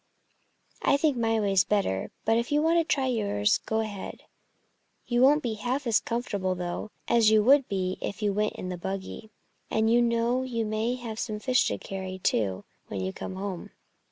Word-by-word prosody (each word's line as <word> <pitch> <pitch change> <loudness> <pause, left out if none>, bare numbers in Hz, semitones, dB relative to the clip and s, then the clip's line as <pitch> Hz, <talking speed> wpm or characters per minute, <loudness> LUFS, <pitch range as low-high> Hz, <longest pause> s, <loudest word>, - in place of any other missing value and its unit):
"I 280 - +3
think 295 -1 +2
my 225 -1 +1
way's 195 -3 +3
better. 195 - 0 0.2
But 225 - +3
if 235 +3 -1
you 295 +1 +3
want 335 +1 +4
to - - +3
try 280 -4 0
yours, 205 -4 +1
go 220 0 +1
ahead! 205 -3 -6 0.8
You 240 0 +1
won't 290 +4 +5
be 235 -3 -1
half 245 +6 -2
as 230 -3 +3
comfortable, 200 -6 -2
though, 180 +3 -4 0.2
as 230 -2 +5
you 215 -1 +5
would 275 +3 +5
be 185 -1 -2
if 200 - -4
you 205 -1 +2
went 210 +1 0
in 185 - -6
the 180 - -4
buggy. 195 +3 -5 0.4
And 220 0 +2
you 240 - +5
know 235 +1 +1
you 235 -3 -2
may 215 +3 -1
have 230 -3 -6
some 215 -2 -3
fish 250 +3 +2
to - - -1
carry, 190 -1 -6
too, 100 - 0 0.2
when 100 - -5
you 95 0 -3
come 185 - -6
home." 190 -2 -5
220 Hz, 195 wpm, -27 LUFS, 195-240 Hz, 0.8 s, won't